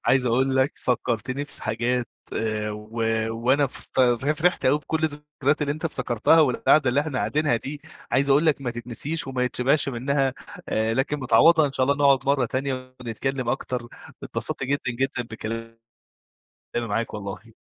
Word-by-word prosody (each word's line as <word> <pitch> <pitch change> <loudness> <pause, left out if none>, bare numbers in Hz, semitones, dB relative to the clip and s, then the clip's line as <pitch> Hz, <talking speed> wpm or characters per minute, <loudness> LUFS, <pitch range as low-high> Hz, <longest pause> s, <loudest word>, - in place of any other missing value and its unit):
عايز 130 -1 +3
أقول 130 +3 +2
لك 130 +1 +3
فكرتني 125 +2 -1
في 145 - -13
حاجات 120 +2 -1 0.2
آآ، 110 -1 -1
و 105 +1 -9 0.4
وأنا 125 +5 +2
ف 130 - -3 0.4
فرحت 180 +2 +2
أوي 145 +3 +4
بكل 155 +2 -3
الذكرايات 150 -1 -1
اللي 145 - 0
أنت 155 +3 -8
افتكرتها، 125 +1 +3
والقاعدة 140 0 +4
اللي 135 +4 +2
إحنا 145 -4 -3
قاعدينها 125 +4 +1
دي 145 +5 -6 0.3
عايز 140 +1 +2
أقول 145 +4 +4
لك 150 -3 +2
ماتتنسيش 120 +5 -3
وما 130 -1 -1
يتشبعش 130 +4 +1
منها 135 +1 0 0.3
آآ، 110 +1 0
لكن 145 +3 0
متعوضة 160 +4 +5
إن 140 - -4
شاء 130 -1 +1
الله 140 +1 +2
نقعد 140 -2 +3
مرة 140 -3 +2
تانية 130 0 -4
ونتكلم 125 +2 -3
أكتر، 125 -2 -2 0.3
اتبسطت - - -2
جدًا 135 -2 -1
جدًا 135 -2 0
بكلامي 115 0 -6 1.0
معاك 115 -1 -2
والله. 105 +2 -7
130 Hz, 155 wpm, -24 LUFS, 120-140 Hz, 1.0 s, متعوضة